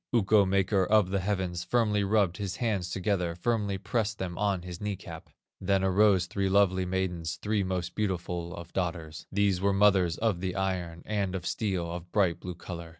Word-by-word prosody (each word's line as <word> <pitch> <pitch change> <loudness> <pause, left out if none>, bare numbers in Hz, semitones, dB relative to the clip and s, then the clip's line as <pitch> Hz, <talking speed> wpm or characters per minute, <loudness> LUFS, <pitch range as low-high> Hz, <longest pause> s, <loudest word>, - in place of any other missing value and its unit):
Ukko, 105 -3 +4
maker 95 0 +2
of 105 -1 +3
the 100 - +1
heavens, 95 -3 -2
Firmly 105 +1 +1
rubbed 100 -3 +2
his 95 -3 -3
hands 105 -7 -1
together, 90 -2 -1
Firmly 100 +1 0
pressed 110 +2 -1
them 90 -2 -4
on 100 -3 0
his 90 0 -8
knee 105 -1 -2
cap, 85 -2 -10 0.3
Then 95 0 +1
arose 95 -1 +4
three 95 +1 -1
lovely 95 -1 +3
maidens, 90 -4 -2
Three 105 +6 -1
most 90 -2 -2
beautiful 90 -4 -2
of 85 0 -10
daughters; 85 -4 -3
These 100 -2 +1
were 100 0 +2
mothers 95 -4 +4
of 110 -6 0
the 90 0 -3
iron, 90 -3 -2
And 100 -3 -1
of 90 -2 -5
steel 95 -6 -1
of 85 0 -7
bright 95 -5 +2
blue 90 -1 -6
color. 85 -1 -8
95 Hz, 185 wpm, -29 LUFS, 90-100 Hz, 0.3 s, Ukko